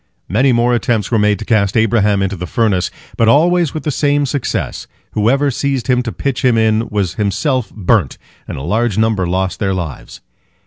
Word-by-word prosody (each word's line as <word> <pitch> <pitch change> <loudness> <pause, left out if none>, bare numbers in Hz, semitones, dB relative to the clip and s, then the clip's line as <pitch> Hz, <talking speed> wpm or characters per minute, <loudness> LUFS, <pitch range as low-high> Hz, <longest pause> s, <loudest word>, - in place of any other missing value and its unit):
Many 125 +9 +2
more 120 0 +2
attempts 115 -3 0
were 115 - +2
made 105 0 +2
to 110 - -8
cast 100 -2 +1
Abraham 105 -3 +2
into 95 +1 -2
the 90 0 -6
furnace, 100 -6 0 0.3
but 115 - +3
always 170 +5 +3
with 155 - -4
the 150 - -1
same 145 +1 +1
success—whoever 135 -1 -2
seized 135 -1 -2
him 125 0 +2
to 120 -2 -4
pitch 135 +1 -3
him 125 -3 +3
in 110 0 +1
was 100 -4 -1
himself 110 +5 -1
burnt, 100 - 0 0.3
and - - -6
a 70 - -6
large 110 +5 0
number 110 -4 +1
lost 95 0 -2
their 95 -2 0
lives. 85 -7 -6
110 Hz, 185 wpm, -16 LUFS, 100-125 Hz, 0.3 s, but